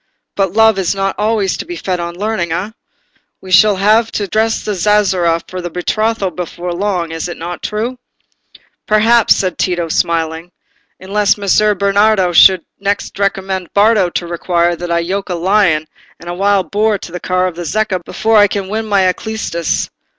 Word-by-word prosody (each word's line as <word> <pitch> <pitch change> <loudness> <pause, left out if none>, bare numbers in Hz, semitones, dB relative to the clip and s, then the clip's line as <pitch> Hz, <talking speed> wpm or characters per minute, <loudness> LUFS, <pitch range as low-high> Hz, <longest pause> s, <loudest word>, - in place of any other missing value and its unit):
But 195 -2 0
love 220 -2 +4
is 190 +1 0
not 195 0 -1
always 210 -3 0
to - - -4
be 350 - -7
fed 185 - -3
on 170 0 -5
learning, 205 -4 -2
eh? 190 +6 -3 0.7
I - - -9
shall 205 +2 +5
have 215 +4 +2
to 205 - -2
dress 220 +3 0
the 210 - -1
zazzera 185 -3 +2
for 185 0 -6
the 175 - -5
betrothal 205 +3 -1
before 175 0 -5
long—is 175 -4 -2
it 175 - -7
not 175 +2 -6
true?" 230 +4 -3 0.9
"Perhaps," 225 +2 +4
said 185 -2 -2
Tito, 175 -2 -1
smiling, 165 +1 -1 0.5
"unless 205 +2 +1
Messer 205 +1 +2
Bernardo 200 -1 +2
should 185 +1 +6
next 200 0 -3
recommend 190 -2 -2
Bardo 205 -2 +4
to 175 - -3
require 170 0 0
that 175 +1 -6
I 170 0 +1
should 170 - -6
yoke 200 +1 -3
a 180 - -1
lion 175 -3 +2 0.3
and 170 - -13
a 175 - -3
wild 195 +1 0
boar 210 0 +1
to 175 - -10
the 180 - -5
car 185 +1 0
of 180 -2 -3
the 175 - -6
Zecca 190 +1 -1
before 220 +5 +1
I 205 0 +6
can 195 -1 -4
win 220 +1 -3
my 200 -2 +2
Alcestis. 185 -3 -2
195 Hz, 180 wpm, -15 LUFS, 175-210 Hz, 0.9 s, should